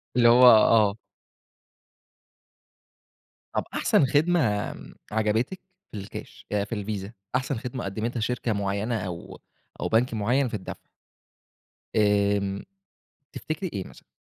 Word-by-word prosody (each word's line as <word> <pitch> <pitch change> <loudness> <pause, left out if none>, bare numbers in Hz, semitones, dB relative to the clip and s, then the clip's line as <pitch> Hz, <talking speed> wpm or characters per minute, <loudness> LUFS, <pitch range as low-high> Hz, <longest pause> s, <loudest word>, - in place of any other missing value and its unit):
اللي 120 -1 +5
هو 125 +2 +6
آه. 110 -3 +6 2.6
طب - - +1
أحسن 205 -11 +3
خدمة، 160 +7 +3 0.3
آمم، - - -12 0.2
عجبتِك 110 - 0 0.3
في 105 - -7
الكاش 95 - -9
آآ 105 -1 +1
في 105 +3 -5
الVisa، 100 0 -4 0.2
أحسن 130 +1 0
خدمة 125 +1 -5
قدمتها 110 +5 -3
شركة 120 0 -1
مُعيّنة 100 +3 -1
أو 85 -2 -7 0.4
أو - - 0
بنك 115 +2 +2
مُعيّن 120 +5 +1
في - - -8
الدفع؟ 100 -4 -5 1.2
آمم، 100 -2 +2 0.7
تفتكري 160 +4 -4
إيه 95 - -3
مثلًا؟ - - -17
110 Hz, 120 wpm, -26 LUFS, 100-125 Hz, 2.6 s, هو